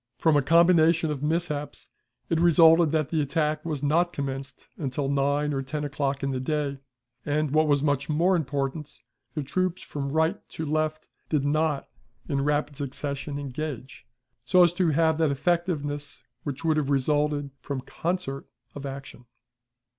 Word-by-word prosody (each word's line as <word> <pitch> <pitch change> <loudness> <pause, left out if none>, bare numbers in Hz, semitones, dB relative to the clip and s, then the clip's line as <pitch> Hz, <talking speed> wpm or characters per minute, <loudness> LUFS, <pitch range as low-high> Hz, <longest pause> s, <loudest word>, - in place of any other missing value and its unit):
From 160 -2 +3
a 145 - +5
combination 165 0 +4
of 140 -3 -4
mishaps, 150 -1 -2 0.4
it 165 - +1
resulted 165 -1 +6
that 155 -3 0
the 160 -2 +1
attack 150 +1 0
was 150 -4 -3
not 170 +4 +2
commenced 135 -1 -5
until 140 -1 -2
nine 140 +1 +1
or 135 - -1
ten 145 +3 -4
o'clock 140 -1 -2
in 135 - 0
the 130 - -2
day, 140 0 -2 0.4
and, 150 0 0
what 155 +1 +3
was 145 -1 +2
much 145 -1 0
more 170 +5 +3
important, 145 -1 -3 0.4
the 150 - -1
troops 185 +5 -1
from 140 -1 -4
right 160 +6 +1
to 160 - -5
left 155 +1 -1 0.2
did 145 -3 +1
not 150 -1 0 0.4
in 140 -3 0
rapid 145 0 0
succession 140 +1 -4
engage, 140 -2 -6 0.4
so 180 -1 +5
as 170 -1 +4
to 175 -2 +2
have 160 +1 +2
that 160 -2 +3
effectiveness 145 -2 -1 0.2
which 145 +1 -5
would 160 -1 +3
have 145 -2 0
resulted 145 +1 +1
from 140 -2 -4
concert 160 -1 -3 0.3
of 140 -1 -6
action. 135 -2 -9
150 Hz, 160 wpm, -26 LUFS, 140-160 Hz, 0.4 s, resulted